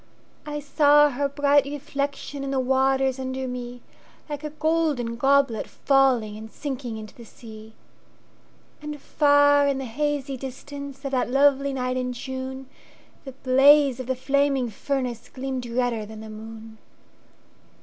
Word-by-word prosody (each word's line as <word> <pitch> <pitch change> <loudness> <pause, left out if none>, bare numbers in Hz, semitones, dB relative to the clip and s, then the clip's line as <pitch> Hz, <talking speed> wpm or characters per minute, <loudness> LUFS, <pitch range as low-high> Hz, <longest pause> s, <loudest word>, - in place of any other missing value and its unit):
I 295 0 -3
saw 295 0 +4
her 280 +2 -1
bright 285 0 +3
reflectionIn 280 -1 -4
the 270 -1 0
waters 265 0 +1
under 260 0 -3
me, 245 -1 -6 0.4
Like 295 -1 -6
a 300 - -3
golden 305 -6 0
goblet 270 -3 +2
fallingAnd 235 -6 +1
sinking 255 -4 -5
into 215 -1 -9
the 235 - -13
sea. 220 -1 -13 1.1
And 300 0 -6
far 285 0 +4
in 280 -1 +1
the 270 - -4
hazy 275 +1 -2
distanceOf 275 +1 -7
that 255 -2 0
lovely 275 +1 +3
night 255 -1 -2
in 250 0 -2
June, 260 +1 -6 0.6
The 265 - -8
blaze 270 +1 +5
of 255 - -6
the 260 - 0
flaming 270 -1 +1
furnaceGleamed 255 0 -4
redder 235 -4 0
than 220 0 -10
the 220 0 -9
moon. 220 0 -10
265 Hz, 130 wpm, -24 LUFS, 245-285 Hz, 1.1 s, blaze